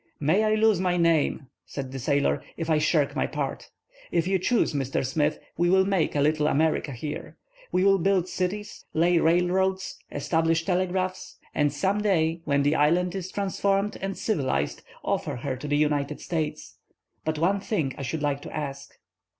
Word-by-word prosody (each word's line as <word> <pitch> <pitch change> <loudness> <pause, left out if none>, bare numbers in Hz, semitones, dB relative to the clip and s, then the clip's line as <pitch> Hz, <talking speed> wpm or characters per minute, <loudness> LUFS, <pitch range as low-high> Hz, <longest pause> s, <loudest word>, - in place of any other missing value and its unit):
"May 160 +9 +3
I 215 0 +3
lose 215 -3 +3
my 180 -1 +1
name," 165 -4 +2 0.2
said 135 -2 -6
the 135 - -5
sailor, 140 +2 +1 0.2
"if 165 -1 -2
I 155 - +4
shirk 150 -2 +2
my - - +1
part! - - -4 0.4
If 170 -1 +1
you 190 0 +2
choose, 230 -1 +1
Mr. 135 -1 -1
Smith, 150 +3 0 0.2
we 175 +1 +2
will 190 +1 +5
make 190 -6 +1
a 145 - +2
little 150 +1 +2
America 155 -1 +1
here. 140 +4 -6 0.3
We 185 - +2
will 195 0 +5
build 185 0 +2
cities, 195 +3 -3
lay 170 +2 +4
railroads, 180 +3 +1
establish 165 +3 +1
telegraphs, 185 0 -1 0.2
and 145 -1 +2
some 195 +7 0
day, 165 -5 +1
when 140 -1 +2
the 145 +2 +3
island 170 +4 +2
is 185 -1 -5
transformed 200 0 0
and 195 0 -3
civilized, 130 - -1 0.2
offer - - -1
her 130 +2 -3
to 135 +4 -7
the 145 0 +1
United 150 -1 0
States. 160 -3 -4 0.4
But 155 0 -1
one 185 +6 +2
thing 175 - -1
I - - -7
should 150 +3 -3
like 145 -1 0
to - - -9
ask." 140 -2 -6
165 Hz, 175 wpm, -26 LUFS, 145-190 Hz, 0.4 s, will